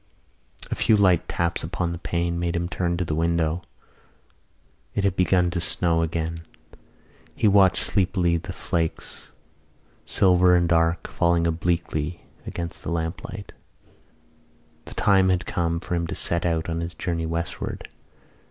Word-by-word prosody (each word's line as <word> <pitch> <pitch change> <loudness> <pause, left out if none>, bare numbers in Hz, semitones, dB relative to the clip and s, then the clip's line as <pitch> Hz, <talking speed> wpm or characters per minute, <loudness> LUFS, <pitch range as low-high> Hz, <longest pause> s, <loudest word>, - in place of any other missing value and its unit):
A - - 0
few 110 - +3
light 90 -4 +3
taps 85 0 -1
upon 85 +1 -2
the 85 - -5
pane 85 0 -1
made 85 0 -1
him 85 0 -1
turn 85 -1 -1
to 90 - -1
the 80 - -2
window. 85 +1 0 1.3
It 100 - 0
had 100 -2 +1
begun 90 -1 +2
to 85 0 -2
snow 85 -1 +1
again. 80 0 -2 0.9
He - - +2
watched 95 -2 +5
sleepily 90 -3 +1
the 85 - -6
flakes, 80 -1 -3 0.8
silver 90 -1 +4
and 85 -1 +3
dark, 80 0 +2
falling 85 0 +1
obliquely 85 -1 -1 0.2
against 85 -1 -5
the - - -5
lamplight. 85 +5 -4 1.3
The - - -10
time 95 -2 +4
had 90 -1 +1
come 85 -1 -1
for 90 - -5
him 85 -1 0
to - - -4
set 85 0 0
out 80 -1 -1
on 85 0 -2
his 85 0 -5
journey 85 0 -2
westward. 85 +1 -4
85 Hz, 145 wpm, -24 LUFS, 85-90 Hz, 1.3 s, watched